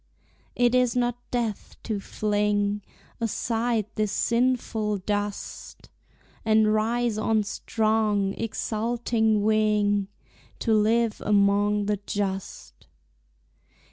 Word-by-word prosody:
It 245 0 +3
is 250 -1 +3
not 245 -1 +1
death 230 -4 -3
to 215 -3 -2
fling 205 0 0 0.4
Aside 230 0 0
this 215 -2 -1
sinful 230 -4 0
dust, 205 +1 -5 0.5
And 220 -1 +4
rise 225 +1 0
on 215 0 +2
strong, 215 -1 0
exulting 220 0 0
wing, 210 -2 +2 0.5
To 225 - 0
live 220 +1 +2
among 205 0 +3
the 210 0 0
just. 195 -2 -4
215 Hz, 90 wpm, -26 LUFS, 205-230 Hz, 0.5 s, And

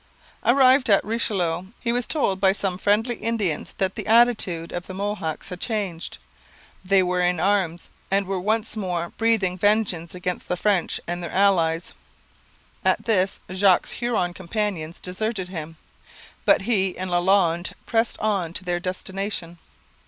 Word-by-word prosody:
Arrived 260 0 +5
at 200 - +5
the - - -13
Richelieu, 190 -6 -1
he 235 - -1
was 245 0 -1
told 195 -11 0
by 190 -1 +5
some 190 -2 -2
friendly 220 +4 +1
Indians 210 -9 -2
that 190 -1 0
the - - -6
attitude 215 -8 +3
of 175 0 -5
the 185 - -7
Mohawks 195 -6 -3
had 180 -1 -7
changed. 200 -7 -3 0.7
They 190 0 +4
were 180 0 0
in 180 -1 +1
arms, 180 -2 0 0.2
and 195 0 +2
were 190 0 -2
once 220 +4 -1
more 175 -5 -2
breathing 210 -6 +2
vengeance 195 -5 +1
against 180 0 -4
the 180 - -1
French 195 -3 +1
and 175 +1 -4
their 170 - -4
allies. 175 -4 +2 0.9
At - - +2
this 195 -4 +1
Jogues's 185 -1 +2
Huron 225 -8 0
companions 185 -3 -3
deserted 190 +1 -3
him, 160 -3 -7 0.7
but - - +4
he 195 -4 +1
and 185 0 -4
Lalande 175 -1 +2
pressed 225 0 +1
on 195 -6 0
to 185 - -4
their 175 -1 0
destination. 185 -1 -4
190 Hz, 150 wpm, -24 LUFS, 175-210 Hz, 0.9 s, Arrived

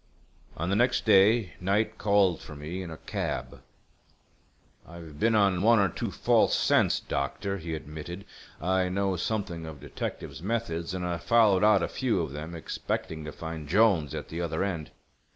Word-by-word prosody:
On 85 +4 -2
the - - +2
next 120 +3 +2
day 105 0 +5
Knight 105 +4 0
called 100 -4 +3
for 80 - -10
me 80 +6 -5
in 90 - -6
a 80 - -8
cab. - - -4 1.3
"I've 80 -3 -11
been 115 +4 +3
on 100 -4 +3
one 115 +3 +5
or 100 -2 +3
two - - -4
false - - +3
scents, - - +3
doctor," 100 +8 -3
he 80 -1 -4
admitted. 80 +5 -8 0.3
"I 90 +2 +1
know 95 0 0
something 90 -5 -3
of 75 -3 -9
detectives' - - -6
methods, 95 -5 -2
and 90 -1 -3
I 90 -1 -1
followed 105 -1 +4
out 105 -4 +5
a - - 0
few 125 -7 0
of 80 -4 -4
them, 80 +4 -6
expecting 80 -1 -4
to 75 - -5
find 80 -2 -7
Jolnes 95 - +3
at - - -6
the 85 +2 -4
other 80 +1 -1
end. 85 -6 -3
90 Hz, 170 wpm, -28 LUFS, 80-100 Hz, 1.3 s, day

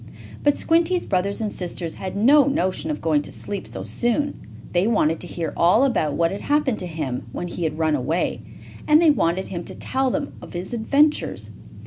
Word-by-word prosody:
But 290 -1 +3
Squinty's 335 +2 +2
brothers 200 +2 0
and 215 -2 -1
sisters 175 -2 -4
had 190 -1 -6
no 270 +7 +6
notion 185 - 0
of 150 - -3
going 155 -3 +2
to - - -9
sleep 200 -2 -5
so - - -6
soon. 280 +5 0 0.4
They 180 +3 +2
wanted 165 -8 +2
to - - -5
hear 170 -2 -4
all 180 +9 +4
about 200 - +1
what 165 0 +2
had 195 - -5
happened 290 -6 +1
to 180 - -3
him 145 -8 -4
when 175 - -4
he 175 -1 -3
had 155 -1 -2
run 160 -1 +1
away, 150 +5 -1 0.5
and 300 0 +6
they 325 -2 +6
wanted 185 - 0
him 175 -2 -4
to - - -7
tell 265 0 -1
them 280 +3 -2
of - - -11
his 180 +6 -5
adventures. 285 +6 +1
190 Hz, 200 wpm, -23 LUFS, 165-270 Hz, 0.5 s, no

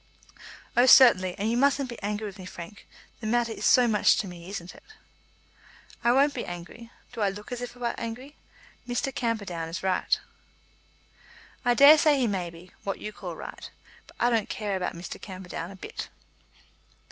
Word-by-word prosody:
"Oh, 245 +2 +5
certainly; 185 -9 +7
and 205 - -1
you - - +1
mustn't 275 +1 +2
be 235 -2 -9
angry 210 +1 -3
with 200 -2 -8
me, 185 - -8
Frank. 185 +3 -10 0.3
The 220 - -5
matter 235 0 +1
is - - -4
so 250 -1 +6
much 215 -2 +4
to 205 - -2
me; 175 0 -10
isn't 180 -3 -6
it?" - - -16 1.2
"I 235 - +4
won't 280 +3 +4
be - - -4
angry. 175 +7 -9 0.2
Do 230 - -5
I 200 - +3
look 205 +4 -9
as 245 -1 -4
if 245 0 -7
I - - -16
were 235 -1 0
angry? 250 +6 -6 0.5
Mr. 250 +3 -2
Camperdown 200 -9 -2
is 165 - -5
right." 190 -1 +1 1.4
"I 245 -1 +3
daresay 295 +2 +7
he 260 - +2
may 190 -5 -2
be 170 +2 -14
what 195 - -3
you 210 - -7
call - - -7
right. - - -9 0.4
But - - -18
I 240 - +3
don't 225 -3 +1
care 210 -5 -2
about 185 -2 -3
Mr. 170 +1 -8
Camperdown 185 -3 -7
a 195 - -10
bit." 185 - -7
215 Hz, 185 wpm, -27 LUFS, 185-245 Hz, 1.4 s, certainly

